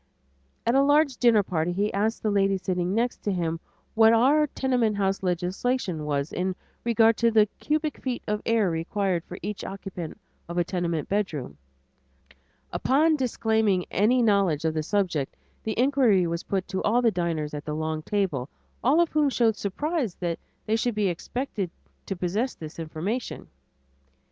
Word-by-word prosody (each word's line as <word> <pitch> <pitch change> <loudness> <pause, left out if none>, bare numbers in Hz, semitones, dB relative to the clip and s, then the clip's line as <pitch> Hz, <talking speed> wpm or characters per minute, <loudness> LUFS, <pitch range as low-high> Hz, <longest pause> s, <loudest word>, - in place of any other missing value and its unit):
At 235 - +2
a 270 - +5
large 290 -1 +3
dinner 230 -4 +5
party 175 -2 -1
he 205 +3 0
asked 215 +3 0
the 215 - +1
lady 195 -1 +2
sitting 180 0 -1
next 240 +2 0
to 205 - -1
him 165 -3 -1 0.3
what 225 0 +6
our 280 +7 +4
tenement 245 -6 0
house 195 -1 0
legislation 180 0 -1
was 145 0 -1
in 185 +1 -1 0.3
regard 225 -1 +4
to 235 - +3
the 220 -2 +5
cubic 305 0 -1
feet 255 -2 -3
of 210 0 -1
air 220 -5 +2
required 175 +2 -1
for 180 - -8
each 210 -1 -4
occupant 190 -4 -7 0.3
of 170 - -4
a 175 - +3
tenement 170 -3 -2
bedroom; 165 - -2 1.2
upon 300 +5 +3
her 310 - +2
disclaiming 220 -7 +1
any 240 +5 +3
knowledge 195 -8 +2
of 160 - +1
the 155 - -1
subject, 170 -6 -1 0.3
the 220 - -3
inquiry 245 -8 +4
was 170 0 -2
put 195 -1 -2
to 190 0 -2
all 240 +4 +2
the 230 - +4
diners 165 -5 -2
at 145 0 -5
the 150 - -3
long 155 0 -2
table, 155 -9 -1 0.3
all 285 +7 +5
of 340 - +2
whom 300 -2 +3
showed 230 -4 +2
surprise 255 - -2
that 170 -2 -3 0.3
they 220 - +1
should 230 0 0
be 205 -2 +2
expected 200 +2 -3 0.4
to 195 - -2
possess 195 +9 -1
this 155 0 -9
information. 165 +10 -4
200 Hz, 170 wpm, -26 LUFS, 175-235 Hz, 1.2 s, what